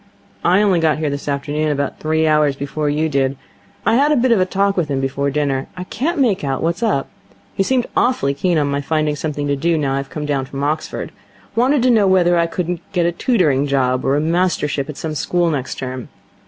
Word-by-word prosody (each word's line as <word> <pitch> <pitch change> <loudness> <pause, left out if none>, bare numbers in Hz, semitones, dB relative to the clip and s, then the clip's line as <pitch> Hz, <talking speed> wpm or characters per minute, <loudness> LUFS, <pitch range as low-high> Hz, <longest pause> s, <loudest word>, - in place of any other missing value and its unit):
'I 185 +4 +4
only 190 -4 +3
got 160 -2 +2
here 155 -2 -1
this 140 +1 -5
afternoon, 145 +2 -1
about 140 -1 -2
three 160 +1 +1
hours 150 -2 +3
before 145 +2 -2
you 155 +2 +1
did. 135 -2 0 0.5
I 225 +3 +4
had 290 +3 +3
a - - +4
bit 250 -1 +2
of 230 - +4
a 185 - +2
talk 195 +1 +1
with 170 -5 -1
him 135 -1 0
before 135 +1 -1
dinner. 140 -2 -1
I 180 - -4
can't 300 - -2
make 235 - +2
out 135 -2 -2
what's 170 +4 -1
up. 205 -12 +1 0.5
He - - -1
seemed 250 +4 +1
awfully 245 - +2
keen 170 +4 0
on 150 - +2
my 140 0 -1
finding 155 0 0
something 150 -1 -3
to 145 0 0
do 165 +4 +1
now 140 -3 0
I've 135 0 -3
come 150 -1 -5
down 140 -3 -1
from 135 +1 -5
Oxford. 155 +2 -2 0.4
Wanted 255 +3 +3
to 255 - +4
know 215 -4 +4
whether 180 -2 +4
I 170 -1 +2
couldn't 175 0 -3
get 175 -3 +2
a 170 - +2
tutoring 165 - +1
job 130 -2 +1
or 135 - +2
a - - +2
mastership 155 -4 0
at 150 - -7
some 160 -1 -4
school 170 +3 0
next 135 -4 -3
term. 130 -1 -6
155 Hz, 230 wpm, -19 LUFS, 140-180 Hz, 0.5 s, I